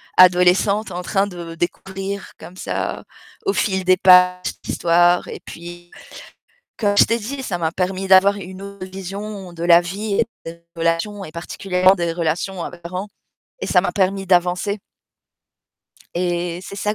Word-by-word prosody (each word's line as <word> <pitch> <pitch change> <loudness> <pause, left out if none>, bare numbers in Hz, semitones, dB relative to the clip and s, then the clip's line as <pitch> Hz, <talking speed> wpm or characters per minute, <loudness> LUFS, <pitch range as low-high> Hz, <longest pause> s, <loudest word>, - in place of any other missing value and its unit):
adolescente 185 +3 +4
en 175 - -4
train 195 +2 +1
de 170 -3 -8
découvrir, 195 +3 -4
comme 175 +3 -11
ça, - - -3 0.4
au 395 - +2
fil 190 -3 0
des 185 0 +4
pages, 180 0 +6 0.2
l'histoire 175 +1 +3
et - - -8
puis, 175 +1 -10 0.9
comme 205 -2 +1
je - - +8
t'ai 230 - 0
dit, 265 +5 -5
ça 190 -8 -2
m'a 160 -1 -1
permis 185 +1 -2
d'avoir 195 +2 +6
une 190 -1 -9
autre 200 -1 -8
vision 195 0 -7
de 170 0 -5
la 170 0 +7
vie 200 +4 -3
et - - +2 0.2
des 170 +1 -9
relations 165 +5 -1
et 155 - -10
particulièrement 180 +2 +1
des 170 -3 -2
relations 170 +2 -2
à - - -4
mes 175 - -12
parents 180 +4 -6 0.5
et - - -3
ça 180 - +4
m'a 180 - -1
permis 195 0 0
d'avancer. 180 +3 +1 1.4
Et 175 -1 -2
c'est 200 - -9
ça 210 +1 -1
185 Hz, 165 wpm, -20 LUFS, 175-195 Hz, 1.4 s, je